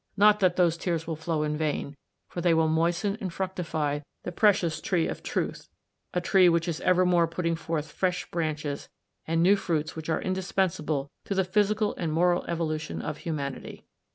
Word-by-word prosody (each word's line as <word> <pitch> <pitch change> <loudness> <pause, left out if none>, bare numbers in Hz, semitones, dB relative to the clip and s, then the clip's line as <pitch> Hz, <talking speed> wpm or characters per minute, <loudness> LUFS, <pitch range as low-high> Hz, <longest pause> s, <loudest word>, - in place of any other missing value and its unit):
Not 210 +1 +6
that 185 -2 +2
her 175 -2 +5
tears 165 -1 -2
will 160 - -3
flow 160 -1 -1
in 150 0 -1
vain, 150 -2 -2 0.3
for 175 - -5
those 175 - +2
tears - - +3
will 160 0 +3
moisten 170 +5 +1
and 190 -3 -3
fructify 165 -5 -2 0.2
the - - -4
precious 185 -4 +2
tree 175 -4 +1
of - - -5
Truth; - - -3 0.4
a 180 - 0
tree 180 +1 +5
which 170 0 +1
is 165 -2 -3
evermore 180 -2 +4
put 165 +3 -5
ting 165 0 +1
forth 160 -2 -3
fresh 180 -1 -1
branches 155 -4 -3 0.4
and 165 +1 +2
new 195 +3 +6
fruits 165 -6 -2
which 160 0 -6
are 160 - +1
indispensable 180 -6 -1
to 200 - -2
the 190 - +3
physical 210 +3 +1
and 165 -3 -2
moral 175 +2 +2
evolution 160 -2 -2
of 150 0 -4
humanity." 145 -5 -5
170 Hz, 185 wpm, -27 LUFS, 155-185 Hz, 0.4 s, Not